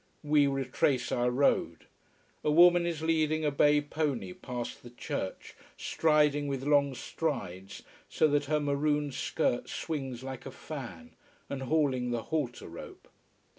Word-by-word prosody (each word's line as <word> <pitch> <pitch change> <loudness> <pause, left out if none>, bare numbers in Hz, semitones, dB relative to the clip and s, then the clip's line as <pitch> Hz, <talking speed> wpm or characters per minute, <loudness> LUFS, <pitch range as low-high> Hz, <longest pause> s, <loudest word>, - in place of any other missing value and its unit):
We 150 -1 +4
retrace 135 -1 0
our 120 0 +2
road. 130 +3 +1 0.6
A - - +1
woman 175 +2 +6
is 160 -2 -3
leading 155 -1 +1
a 150 - +2
bay 145 +1 +4
pony 145 -10 -2
past 125 +2 -6
the 120 - -11
church, 105 -5 -5 0.2
striding 150 -2 +2
with 135 -2 -3
long 140 -1 +3
strides, 95 - -4 0.3
so 155 - +3
that 145 0 +1
her 150 +1 +1
maroon 145 0 0
skirt 120 -1 -1
swings 135 -6 -4
like 130 -1 -7
a - - -6
fan, 155 - -8 0.4
and 140 -1 -3
hauling 135 -3 +1
the 120 -2 -2
halter 145 -7 -3
rope. - - -11
145 Hz, 140 wpm, -30 LUFS, 130-150 Hz, 0.6 s, woman